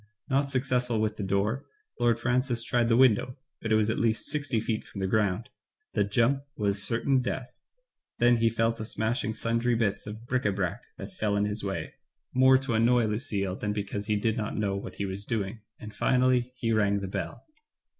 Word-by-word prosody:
Not 140 +1 +2
suc 130 -2 +1
cessful 125 -3 0
with 110 0 0
the 105 - -3
door. 100 +7 0 0.3
Lord 120 -1 +3
Francis 120 0 +1
tried 120 -1 +1
the 115 - +4
window, 125 0 +4 0.2
but 110 - -3
it - - +5
was 110 -1 +3
at - - -2
least 115 -1 +1
sixty 145 -5 -1
feet 110 0 -2
from 100 - -9
the 95 - 0
ground 105 +3 0 0.2
— 430 - -53
the - - +2
jump 115 +7 +2 0.2
was 100 -1 0
certain 130 +5 +2
death 125 0 -4 0.3
— - - -62
then 120 0 +4
he 115 0 +3
fell 115 0 +1
to 115 - -6
smashing 110 +1 -2
sundry 115 +1 +1
bits 110 -3 -1
of 110 +2 -8
bric 125 +1 0
a 100 - +3
brac 95 -3 -2 0.2
that - - -8
fell 105 -2 0
in 100 0 +2
his 105 +1 -2
way 95 -1 -3 0.2
— 65 +3 -51
more 130 +1 +6
to 135 -2 -3
annoy 115 +1 +4
Lucille 105 -4 -1
than 105 +1 -2
because 105 0 -4
he 105 - +2
did 110 +2 0
not 105 -2 -3
know 100 -2 0
what 100 - -6
he 100 - -2
was 95 +1 -5
doing; 110 -1 -3 0.2
and 105 -1 -9
finally 125 +2 +2
he 115 -2 0
rang 100 -2 +2
the 95 - -3
bell. 95 -3 -5
115 Hz, 215 wpm, -28 LUFS, 105-125 Hz, 0.3 s, more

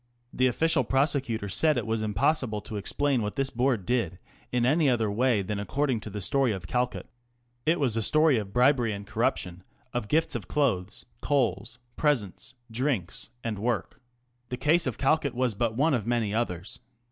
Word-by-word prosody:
The 130 - +3
official 160 +5 +2
of 130 - +1
Reviews. - - -5
prosecutor 135 -6 +1
said 155 +10 +2
it - - -1
was 110 -1 -1
impossible 110 +2 +1
to 110 - -8
explain 135 +5 0
what 105 -1 -3
this 135 0 -1
Board 120 -5 0
did 105 -6 0 0.3
in 125 -1 +1
any 150 +3 +3
other 115 -4 +1
way 115 -1 +2
than 100 +1 -3
according 130 +3 0
to 110 - -8
the 105 0 -5
story 135 +4 +2
of 95 -4 -5
Calcutt. 125 +6 -2 0.6
It 165 +2 +3
was 130 -6 +2
a 115 - +1
story 155 +2 +4
of 100 -2 -6
bribery 125 -2 +3
and 100 0 -7
corruption, 90 -2 -1 0.3
of 120 -4 -2
gifts 160 +8 +1
of - - -4
clothes, 110 -10 -1 0.2
coals, 120 -4 0 0.2
presents, 130 - -1 0.2
drinks, 120 - -2
and 110 -3 -3
work. 110 -4 -2 0.5
The 125 - -3
case 160 +4 +3
of 125 - -3
Calcutt 140 -2 +1
was 125 -2 +1
but 110 +2 -1
one 150 +3 +3
of 115 -4 -1
many 115 -4 0
others. 95 -5 -3
120 Hz, 185 wpm, -27 LUFS, 105-135 Hz, 0.6 s, story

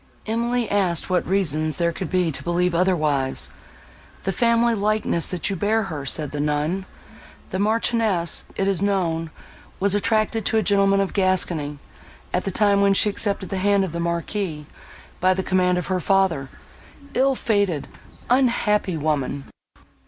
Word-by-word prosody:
Emily 235 +1 0
asked 185 -3 0
what 180 - +1
reasons 155 -5 +1
there 170 +2 0
could 175 +1 -5
be 180 -3 +1
to 135 - -6
believe 175 +1 0
otherwise. 155 -7 +1 0.7
"The 195 - 0
family 235 +3 +2
likeness, 210 -5 0
that 180 -3 -3
you - - -1
bear 215 +4 +1
her," 155 -8 -6
said 150 +2 +2
the 145 - -5
nun. 150 +6 -1 0.6
"The 185 - -2
Marchioness, 215 -4 +2
it 195 - 0
is 195 -2 +1
known, 170 -5 0 0.5
was 200 0 +1
attached 215 +1 +1
to 220 - +1
a 220 - +2
gentleman 195 0 +3
of 195 - -2
Gascony, 175 -6 0 0.6
at - - 0
the - - 0
time 200 0 +3
when 200 0 +4
she 210 - +3
accepted 200 -2 -2
the 195 - -3
hand 200 0 +2
of 185 - -6
the 170 - -4
Marquis, 170 -1 -3 0.5
by 185 +1 +3
the 190 - -2
command 180 -1 +2
of 180 - -2
her 185 -1 -1
father. 180 -7 +1 0.6
Ill 270 +1 +2
fated, 200 - 0 0.4
unhappy 230 -7 +2
woman!" 145 -2 -1
190 Hz, 160 wpm, -22 LUFS, 170-205 Hz, 0.7 s, when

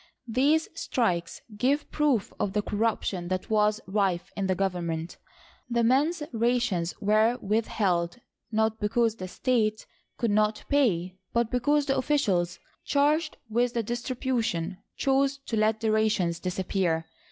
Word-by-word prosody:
These 280 +7 +2
strikes 180 - -1
give 275 +7 0
proof 285 -9 +1
of 195 - -1
the 210 0 0
corruption 205 -5 -1
that 185 +3 -3
was 210 0 +3
rife 190 -3 0
in 195 -1 -1
the 185 - +1
government. 175 -3 -2 0.5
The 235 -1 +1
men's 295 +7 +2
rations 225 -7 +1
were 215 +3 +3
withheld, 195 -4 0 0.3
not 220 0 +1
because 225 +1 +1
the 185 - -5
state 215 0 0 0.3
could 230 -3 0
not 215 +1 +1
pay, 190 -10 +1
but 235 -1 +1
because 285 +4 +2
the 270 -1 +1
officials 195 - +1 0.3
charged 300 +3 +1
with 240 +2 0
the 230 - +1
distribution 235 -7 -2 0.2
chose 275 0 +2
to 225 - -2
let 215 0 +2
the 220 -1 +1
rations 215 -6 +1
disappear. 180 -3 -1
220 Hz, 135 wpm, -27 LUFS, 190-245 Hz, 0.5 s, was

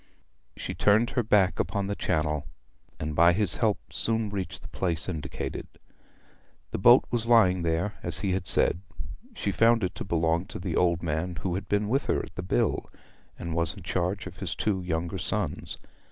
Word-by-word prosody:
She - - -4
turned 105 +3 +3
her 125 - +1
back 105 -4 +2
upon 100 -1 -1
the 100 - -2
Channel, 75 -5 -1 0.5
and 75 -1 -4
by 85 +2 +6
his 95 -2 +3
help 110 -3 +2 0.2
soon 110 -2 0
reached 95 -3 -5
the - - -9
place 85 -3 -1
indicated. 80 -5 -5 1.0
The - - -3
boat - - +7
was 115 -1 -1
lying 100 -7 +5
there 85 +5 0
as 85 -1 +2
he 95 - 0
had 95 +1 -2
said. 90 - +3 0.5
She 100 - -2
found 115 +2 +3
it 90 - -1
to - - -6
belong 85 0 0
to - - -7
the - - -3
old 85 -2 +2
man 85 +2 -2
who 90 - -2
had 95 +3 -4
been 105 0 +1
with 135 +6 0
her - - +2
at - - -16
the - - -5
Bill, - - 0 0.5
and 85 -1 -5
was 85 -1 +1
in 95 - -11
charge 95 +1 -2
of 95 -1 -9
his 90 -2 -3
two 100 -3 0
younger 85 +1 -3
sons. 85 -2 -2
90 Hz, 190 wpm, -27 LUFS, 85-105 Hz, 1.0 s, boat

